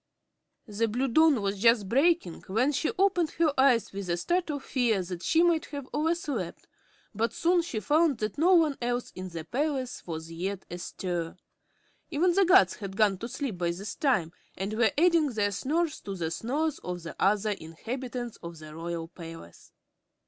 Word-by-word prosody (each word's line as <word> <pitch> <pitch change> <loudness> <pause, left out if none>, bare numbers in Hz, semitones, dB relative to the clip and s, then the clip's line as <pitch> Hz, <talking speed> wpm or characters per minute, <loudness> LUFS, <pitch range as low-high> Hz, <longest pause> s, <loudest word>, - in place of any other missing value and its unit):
The 225 +1 -1
blue 245 +5 0
dawn 285 -2 +4
was 200 0 -1
just 230 -2 +4
breaking 275 - +2
when 230 +9 +2
she 295 +2 0
opened 370 -4 +3
her 320 -3 +3
eyes 260 -6 +3
with 195 -2 -5
a 170 - +1
start 350 - 0
of 285 -2 -3
fear 230 -7 +1
that 175 -1 -6
she 330 - +3
might 335 -2 +2
have 280 -3 -7
overslept, 300 - -2 0.5
but 225 +2 -1
soon 345 +1 +3
she 330 -10 -4
found 295 - +2
that 215 -1 -3
no 360 +4 +5
one 315 -5 +3
else 245 0 -2
in 185 0 -7
the 165 -2 -7
palace 265 - -2
was 160 -1 -6
yet 190 +3 -4
astir. 175 -1 -4 0.7
Even 350 +4 +2
the 390 +2 +4
guards 370 +2 +5
had 195 -2 -7
gone 205 -4 +3
to 230 - -5
sleep 245 -9 -4
by 175 -1 +1
this 200 +4 -4
time 215 - +1 0.3
and 195 +3 -3
were 225 0 +3
adding 335 -1 +4
their 205 -4 0
snores 305 - -1
to 195 - -5
the 165 -3 -3
snores 290 - -1
of 180 -1 -6
the 170 - -7
other 210 +2 +2
inhabitants 240 +8 -5
of 170 0 -9
the 155 -1 -11
Royal 165 0 -4
Palace. 165 - -11
230 Hz, 180 wpm, -28 LUFS, 185-300 Hz, 0.7 s, no